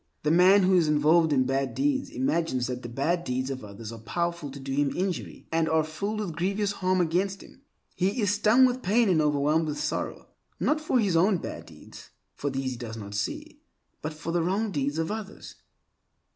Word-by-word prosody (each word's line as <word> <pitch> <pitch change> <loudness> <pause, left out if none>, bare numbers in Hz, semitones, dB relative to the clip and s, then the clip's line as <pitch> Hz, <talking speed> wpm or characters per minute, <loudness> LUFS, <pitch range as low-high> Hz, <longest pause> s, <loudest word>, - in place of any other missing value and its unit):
The 150 - +2
man 185 +4 +6
who 185 +1 +3
is 170 -3 +4
involved 155 +2 +4
in 130 -3 +3
bad 135 +1 -1
deeds 275 -1 0
imagines 165 - 0
that 125 0 -4
the 120 - -7
bad 160 +8 0
deeds 130 0 -2
of 130 -3 -6
others 105 +2 -8
are 115 - -9
powerful 170 +6 -3
to 140 +1 -9
do 135 0 -6
him 145 0 +2
injury 185 0 -3
and 160 0 +1
are 160 0 +3
filled 200 +8 -3
with 175 -6 -4
grievous 195 +4 0
harm 185 -2 0
against 185 +3 0
him. 265 - -17 0.3
He 195 +6 0
is 205 -3 +2
stung 215 +5 +5
with 255 0 0
pain 225 +1 +3
and 165 -4 +3
overwhelmed 150 +2 +2
with 150 -1 -3
sorrow, 150 0 -3 0.3
not 305 +1 +1
for 305 -4 +1
his 200 -6 +1
own 185 +4 +4
bad - - -7
deeds - - -13 0.2
(for 145 - -3
these 135 -1 -2
he 125 - -6
does 115 -2 -7
not 100 -2 -8
see) 100 0 -4 0.4
but 155 - -3
for 165 +2 -5
the 175 0 +1
wrong 200 +5 0
deeds 145 -2 -1
of 165 +2 -1
others. 215 -1 -7
165 Hz, 210 wpm, -27 LUFS, 140-195 Hz, 0.4 s, man